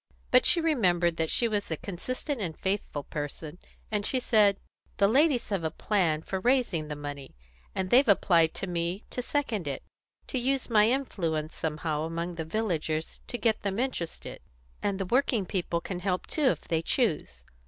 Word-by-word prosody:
But -, -, +6 dB
she 345 Hz, -, +5 dB
remembered 180 Hz, -, +2 dB
that 160 Hz, -1 st, 0 dB
she 235 Hz, -, +2 dB
was 210 Hz, -2 st, -1 dB
a 160 Hz, -, -2 dB
consistent 255 Hz, -, -4 dB
and 165 Hz, -5 st, -4 dB
faithful 190 Hz, -7 st, -2 dB
person, 150 Hz, +3 st, -6 dB, 0.3 s
and 210 Hz, -1 st, 0 dB
she 255 Hz, -, +1 dB
said: 210 Hz, -5 st, +4 dB, 0.4 s
"The 200 Hz, -, +5 dB
ladies 265 Hz, +1 st, +3 dB
have 195 Hz, -5 st, -1 dB
a 160 Hz, -, +1 dB
plan 165 Hz, -3 st, 0 dB
for 190 Hz, -, -3 dB
raising 230 Hz, -, +1 dB
the 150 Hz, -, -4 dB
money, 145 Hz, -, -7 dB, 0.4 s
and 185 Hz, -1 st, -2 dB
they've 260 Hz, +2 st, +6 dB
applied 170 Hz, -5 st, +4 dB
to -, -, -3 dB
me 175 Hz, +2 st, -2 dB
to 250 Hz, -, -2 dB
second 240 Hz, -, -2 dB
it 140 Hz, -, -4 dB, 0.4 s
to 260 Hz, -, -2 dB
use 260 Hz, 0 st, 0 dB
my 215 Hz, 0 st, +5 dB
influence 170 Hz, -, -1 dB
somehow 155 Hz, -1 st, -2 dB
among 170 Hz, +2 st, -3 dB
the 165 Hz, -1 st, -4 dB
villagers 160 Hz, -5 st, -2 dB
to 245 Hz, -, -4 dB
get 225 Hz, -3 st, +1 dB
them 200 Hz, -1 st, -2 dB
interested; 240 Hz, -10 st, -3 dB, 0.4 s
and 200 Hz, -1 st, -1 dB
the 195 Hz, -, -1 dB
working 240 Hz, -1 st, +2 dB
people 175 Hz, -2 st, -1 dB
can 175 Hz, +1 st, -5 dB
help 180 Hz, 0 st, -1 dB
too 305 Hz, -, 0 dB
if 260 Hz, -, +3 dB
they 160 Hz, -1 st, -1 dB
choose. 150 Hz, -, -1 dB
190 Hz, 180 wpm, -28 LUFS, 160-235 Hz, 0.4 s, But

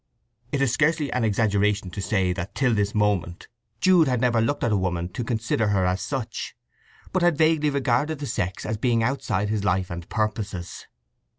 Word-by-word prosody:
It 140 Hz, -1 st, +1 dB
is 125 Hz, -4 st, +1 dB
scarcely 155 Hz, 0 st, +1 dB
an 125 Hz, -, 0 dB
exaggeration 105 Hz, -2 st, +1 dB
to 100 Hz, -, -5 dB
say 95 Hz, -3 st, +1 dB
that 90 Hz, +1 st, -6 dB
till 130 Hz, -4 st, +2 dB
this 105 Hz, -1 st, 0 dB
moment 100 Hz, -5 st, 0 dB, 0.3 s
Jude 180 Hz, -5 st, +5 dB
had 125 Hz, -2 st, +1 dB
never 120 Hz, -2 st, +2 dB
looked 145 Hz, +6 st, -1 dB
at 120 Hz, -, +1 dB
a -, -, +3 dB
woman 90 Hz, -2 st, -1 dB
to 120 Hz, -, -4 dB
consider 110 Hz, -1 st, 0 dB
her 100 Hz, -2 st, +2 dB
as 90 Hz, +1 st, 0 dB
such, 135 Hz, -6 st, -4 dB, 0.6 s
but 185 Hz, -, +1 dB
had 175 Hz, -3 st, +3 dB
vaguely 155 Hz, -1 st, +3 dB
regarded 140 Hz, +2 st, 0 dB
the 145 Hz, -, -5 dB
sex 95 Hz, -8 st, -3 dB
as 110 Hz, 0 st, -2 dB
beings 115 Hz, 0 st, +1 dB
outside 110 Hz, -6 st, -1 dB
his 105 Hz, -2 st, -1 dB
life 95 Hz, -3 st, 0 dB
and 85 Hz, 0 st, -7 dB
purposes. 105 Hz, -5 st, -3 dB
110 Hz, 190 wpm, -24 LUFS, 95-135 Hz, 0.6 s, Jude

